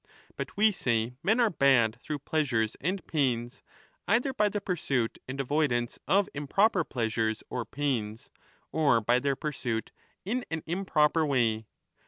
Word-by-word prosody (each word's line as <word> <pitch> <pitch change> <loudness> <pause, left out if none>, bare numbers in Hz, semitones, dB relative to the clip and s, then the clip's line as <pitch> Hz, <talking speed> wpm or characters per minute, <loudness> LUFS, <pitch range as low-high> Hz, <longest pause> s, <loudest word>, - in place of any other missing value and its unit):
But - - -6
we 215 +1 +5
say 120 - 0
men 220 +5 +2
are 230 -3 +4
bad 125 -6 +3
through 150 - -3
pleasures 120 -8 0
and 185 +4 -2
pains, 125 -4 -1 0.5
either 245 +6 +2
by 210 -4 +2
the 205 - -2
pursuit 140 - -1
1222^ - - -16
and 135 +2 -5
avoidance 135 -4 0
of 200 +1 +3
improper 180 +7 +2
pleasures 110 -4 -1
or 125 -2 -2
pains 115 -4 -3 0.4
or 145 -7 +3
by 120 +3 +2
their 140 +1 0
pursuit 125 -7 -3 0.3
in 245 +6 -1
an 160 -1 -3
improper 165 -3 +2
way. 115 -7 +1
140 Hz, 150 wpm, -29 LUFS, 120-175 Hz, 0.5 s, we